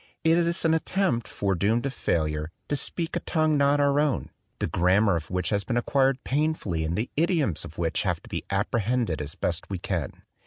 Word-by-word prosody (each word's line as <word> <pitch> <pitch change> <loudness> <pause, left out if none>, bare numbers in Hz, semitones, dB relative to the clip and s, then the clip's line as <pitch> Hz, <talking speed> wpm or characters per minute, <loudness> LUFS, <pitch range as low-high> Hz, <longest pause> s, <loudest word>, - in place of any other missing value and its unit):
It 165 +1 +5
is 170 0 +1
an 160 - +4
attempt, 160 - 0
foredoomed 100 +4 0
to 140 - -1
failure, 75 - -1 0.2
to 145 - +1
speak 165 +4 -2
a - - +1
tongue 155 -2 +1
not 140 0 +3
our 140 0 +3
own, 150 -3 0 0.3
the - - -1
grammar 95 +3 +3
of 80 -2 -4
which 90 -1 -1
has 100 -1 +1
been 120 +5 -1
acquired 135 +1 +2
painfully 140 - 0
and 80 +2 -2
the 110 +4 -2
idioms 155 - +1
of 75 - -11
which 85 -2 0
have - - 0
to - - -14
be - - -4
appre 100 +4 0
hended 115 -7 0
as 75 +1 -5
best 90 0 -2
we 95 - -2
can. 85 -6 -4
120 Hz, 205 wpm, -26 LUFS, 90-150 Hz, 0.3 s, It